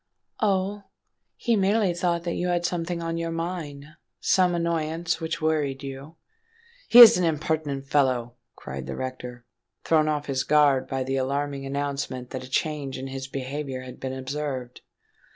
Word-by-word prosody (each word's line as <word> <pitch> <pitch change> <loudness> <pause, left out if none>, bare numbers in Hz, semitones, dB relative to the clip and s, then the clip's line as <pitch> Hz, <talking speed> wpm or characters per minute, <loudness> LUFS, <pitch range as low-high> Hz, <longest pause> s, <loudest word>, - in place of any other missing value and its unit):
"Oh? 200 0 0 0.5
he 235 - +1
merely 200 -1 +2
thought 170 -1 0
that 170 -1 -2
you 180 - -2
had 175 -1 0
something 170 0 -2
on 165 0 -2
your 165 0 -2
mind—some 165 +2 -2
annoyance 165 0 -1
which 160 0 -3
worried 145 -4 0
you——" 140 +4 -8 0.7
"He - - +6
is 230 -6 +11
an - - +1
impertinent 155 -3 -1
fellow!" 130 -4 +1 0.2
cried 65 0 -7
the 70 - -4
rector, 125 -2 -6 0.4
thrown 155 -2 +3
off 150 -1 -1
his 135 -2 -1
guard 140 -3 +3
by 135 -1 -2
the 135 +1 -2
alarming 140 +1 -2
announcement 140 -2 -3
that 130 - -5
a 130 - -10
change 145 -1 -2
in 135 +1 -6
his 135 0 -5
behaviour 135 0 -4
had 130 -1 -10
been 130 0 -4
observed. 130 -1 -5
145 Hz, 155 wpm, -25 LUFS, 135-170 Hz, 0.7 s, is